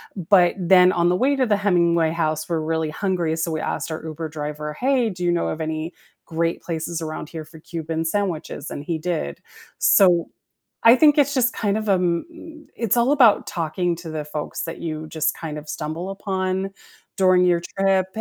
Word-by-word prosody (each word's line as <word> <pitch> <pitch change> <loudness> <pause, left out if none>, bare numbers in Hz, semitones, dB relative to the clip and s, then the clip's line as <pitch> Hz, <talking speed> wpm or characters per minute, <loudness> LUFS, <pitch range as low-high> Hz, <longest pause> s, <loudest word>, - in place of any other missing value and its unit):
but 180 -1 +4
then 180 0 +6
on 175 -1 +2
the 180 - +2
way 275 +8 +2
to 260 -2 +2
the 205 -2 +2
Hemingway 170 -5 +2
House, 155 -2 -1
we're 165 -2 -1
really 160 -1 -1
hungry, 175 -3 -1
so 165 0 -2
we 155 - -2
asked - - -3
our 160 - -5
Uber 160 0 -5
driver, 150 0 -5
"Hey, 255 - +1
do 180 -2 -6
you 175 - +2
know 170 - 0
of 160 - -4
any 160 +2 -3 0.3
great 165 0 -2
places 165 0 -4
around 155 -1 -5
here 160 -2 -7
for 160 0 -14
Cuban 165 0 -4
sandwiches?" 165 -5 -3
and 145 - -6
he 165 0 -2
did. 160 - -3 0.4
So, 175 -4 +4 0.5
I 230 +1 +8
think 295 +1 +5
it's 285 0 +3
just 250 -1 +2
kind 205 -1 -1
of 215 -1 -3
a - - +5
m 175 -2 0
m 320 -2 -13 0.2
It's 230 +1 +2
all 240 +4 +3
about 245 -7 +5
talking 175 +1 -2
to 170 -1 -9
the 150 - -3
folks 150 0 -5
that 165 0 -6
you 155 - -2
just 160 -1 0
kind 150 -2 -4
of 150 0 -11
stumble 160 +4 -4
upon 190 -1 -2 0.5
during 185 -1 +4
your 175 -1 +3 0.2
trip. 195 -1 +2
170 Hz, 200 wpm, -22 LUFS, 160-195 Hz, 0.5 s, I